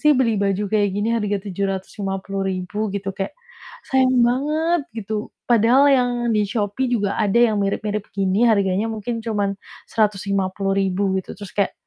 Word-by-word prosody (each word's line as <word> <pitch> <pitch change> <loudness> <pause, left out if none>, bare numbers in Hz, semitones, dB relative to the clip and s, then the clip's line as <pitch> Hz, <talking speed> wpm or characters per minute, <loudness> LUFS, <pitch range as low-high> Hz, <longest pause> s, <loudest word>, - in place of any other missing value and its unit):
sih 300 -1 +5
beli 230 -4 +2
baju 195 +1 +1
kayak 205 -1 +3
gini 205 +2 0
harga 205 -2 0
Rp750.000?" 195 0 -3 0.2
Gitu. 195 -1 -3
Kayak 195 - -3 0.6
sayang 260 -1 +3
banget, 310 +6 +1 0.2
gitu. 215 0 -4 0.2
Padahal 235 +4 +5
yang 250 -2 +3 0.2
di 210 - +3
Shopee 210 +5 -1
juga 205 -4 0
ada 210 +1 +2
yang 220 -3 +3
mirip-mirip 205 +1 -2
gini, 195 +4 +2
harganya 200 0 +2
mungkin 225 +2 -4
cuman 205 -3 -1 0.3
Rp150.000 195 -2 0
gitu, - - -10
terus 200 -3 -8
kayak 200 -2 +1
205 Hz, 140 wpm, -21 LUFS, 195-230 Hz, 0.6 s, sih